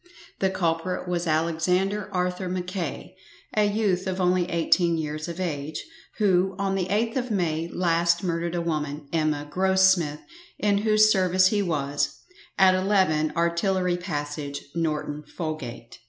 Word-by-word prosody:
The 190 - +2
culprit 180 0 -1
was 175 -1 -1
Alexander 180 +6 0
Arthur 180 0 -1
Mackay, 180 -3 -4 0.4
a 210 -1 +4
youth 205 -3 0
of 185 0 -2
only 180 -1 +2
eighteen 170 0 +2
years 155 0 -4
of 170 +1 -6
age, 155 -4 -3 0.3
who, 190 -2 +2
on 195 -1 -1
the 190 -2 -1
8th 225 +5 0
of 250 -1 -2
May 165 -5 0
last 170 0 +1
murdered 170 -1 -1
a 170 - 0
woman 150 -3 -3
Emma 155 -2 0
Grossmith 190 -2 +2 0.4
in 205 -1 +2
whose 215 0 +4
service 185 -1 +4
he 205 0 +1
was, 145 -6 -1 0.4
at 190 -1 +6
11, 185 -5 +2
Artillery 175 +2 +1
passage, 145 -4 -4
Norton 150 -2 -2
Folgate. 155 -7 -6
175 Hz, 140 wpm, -25 LUFS, 160-190 Hz, 0.4 s, at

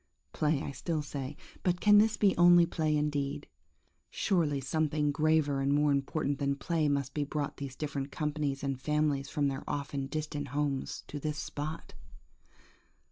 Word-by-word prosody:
Play, 150 -2 +1
I - - -4
still 155 +3 -2
say; 140 -1 -5 0.2
but 180 -1 +1
can 205 +1 +7
this 220 +1 +3
be 200 -2 +3
only 175 0 +7
play 155 -2 0
indeed? 145 -2 -1 0.6
Surely 155 -7 +1
something 150 +1 0
graver 150 -2 +2
and 135 +1 +1
more 145 +1 +3
important 140 +1 0
than 140 -1 +1
play 155 +1 0
must 140 -2 -1
have 145 -1 -1
brought 145 -2 -3
these 140 -2 -6
different 140 -1 -4
companies 150 -3 -2
and 135 -2 -2
families 150 -1 0
from 145 -3 0
their 135 -1 -3
often 140 -1 -3
distant 150 0 -4
homes, 140 0 -2
to 145 - -6
this 150 +1 -3
spot? 155 +3 -5
145 Hz, 160 wpm, -31 LUFS, 140-155 Hz, 0.6 s, can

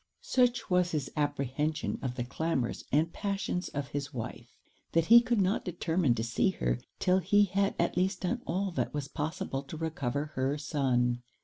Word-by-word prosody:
Such 245 -1 +2
was 180 -1 +2
his 145 -4 -2
apprehension 150 +1 -1
of 130 -2 -3
the 120 - -2
clamours 130 -1 -2
and 160 +4 +2
passions 195 -3 -2
of 140 -1 -4
his 145 0 -4
wife, 115 -5 -7 0.4
that 165 -1 +3
he 235 +4 +9
could 235 -2 +1
not 195 +2 +2
determine 165 -6 +1
to 110 - -2
see 115 +10 +2
her 185 - -1 0.2
'till 185 +1 +3
he 205 +3 +4
had 195 +1 0
at - - +1
least 185 +1 +1
done 235 +7 -1
all 190 +2 0
that 170 - -2
was 145 -2 -2
possible 150 -2 -3
to 140 +3 -8
recover 150 -3 -2
her 135 +3 0
son. 125 -4 +1
155 Hz, 180 wpm, -30 LUFS, 140-185 Hz, 0.4 s, he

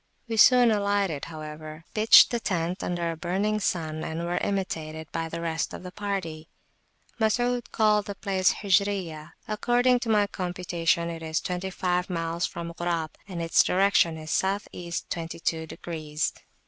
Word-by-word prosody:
We 230 - -2
soon 245 +1 +7
alighted, 200 -7 0
however, 155 0 -8
pitched 215 +1 +7
the 240 - 0
tent 180 -3 -2
under 170 -1 -1
a - - -5
burning 195 +6 -1
sun, 160 -5 -2
and 165 +2 -3
were 175 +1 -1
imitated 160 -5 -3
by 165 0 -3
the 165 +1 -5
rest 165 -1 -2
of - - -9
the 180 - -7
party. 185 -6 -4 0.7
Masud 245 +2 +1
called 210 -2 +3
the 200 - -5
place 190 -2 +2
Hijriyah. 190 -6 0
According 245 +3 +2
to 240 - -4
my 210 -2 +4
computation, 175 -3 -1
it 165 -1 -7
is 160 0 -1
twenty 180 +1 -3
five 180 0 -1
miles 165 -1 -1
from 170 0 -6
Ghurab, 170 -2 -2 0.2
and 175 -4 -4
its 165 - +4
direction 185 -3 +3
is 155 0 -7
South 195 +2 0
East 170 -1 -5
twenty 165 -1 -4
two 160 -1 -2
degrees. 155 -2 -3
175 Hz, 160 wpm, -26 LUFS, 165-200 Hz, 0.7 s, soon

